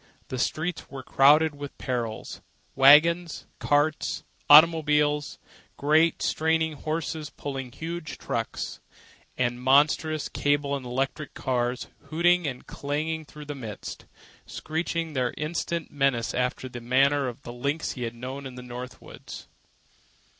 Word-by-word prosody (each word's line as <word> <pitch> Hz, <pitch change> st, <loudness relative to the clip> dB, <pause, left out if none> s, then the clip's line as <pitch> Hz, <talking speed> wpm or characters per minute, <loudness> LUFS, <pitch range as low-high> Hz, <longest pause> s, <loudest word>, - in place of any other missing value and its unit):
The 130 Hz, -, -4 dB
streets 160 Hz, +6 st, -2 dB
were 135 Hz, -1 st, -8 dB
crowded 150 Hz, +4 st, +5 dB
with 145 Hz, -1 st, -8 dB
perils—waggons, 140 Hz, +7 st, +2 dB
carts, 145 Hz, +1 st, +1 dB, 0.3 s
automobiles; 150 Hz, -2 st, +5 dB, 0.4 s
great, 155 Hz, +3 st, +3 dB
straining 160 Hz, 0 st, +1 dB
horses 155 Hz, 0 st, -3 dB
pulling 135 Hz, -4 st, -6 dB
huge 165 Hz, +1 st, -6 dB
trucks; -, -, -4 dB, 0.6 s
and 120 Hz, -1 st, 0 dB
monstrous 150 Hz, +3 st, +3 dB
cable 145 Hz, -1 st, 0 dB
and 130 Hz, -3 st, -6 dB
electric 135 Hz, +3 st, -3 dB
cars 125 Hz, -1 st, -1 dB, 0.2 s
hooting 175 Hz, +1 st, +2 dB
and 125 Hz, -3 st, -5 dB
clanging 155 Hz, +3 st, -3 dB
through 150 Hz, +1 st, -11 dB
the 145 Hz, -, -5 dB
midst, 115 Hz, -7 st, -8 dB, 0.4 s
screeching 165 Hz, 0 st, -3 dB
their 130 Hz, -3 st, +1 dB
insistent 165 Hz, +1 st, -3 dB
menace 135 Hz, -5 st, +1 dB
after 125 Hz, +1 st, -1 dB
the 125 Hz, -1 st, -8 dB
manner 135 Hz, +3 st, +3 dB
of 120 Hz, -, -7 dB
the 120 Hz, -, -7 dB
lynxes 140 Hz, +6 st, -2 dB
he 125 Hz, -, -8 dB
had 120 Hz, -1 st, -3 dB
known 130 Hz, +3 st, -6 dB
in 130 Hz, -, -10 dB
the 125 Hz, -, -8 dB
northern 125 Hz, +1 st, -7 dB
woods. -, -, -11 dB
145 Hz, 125 wpm, -26 LUFS, 130-155 Hz, 0.6 s, crowded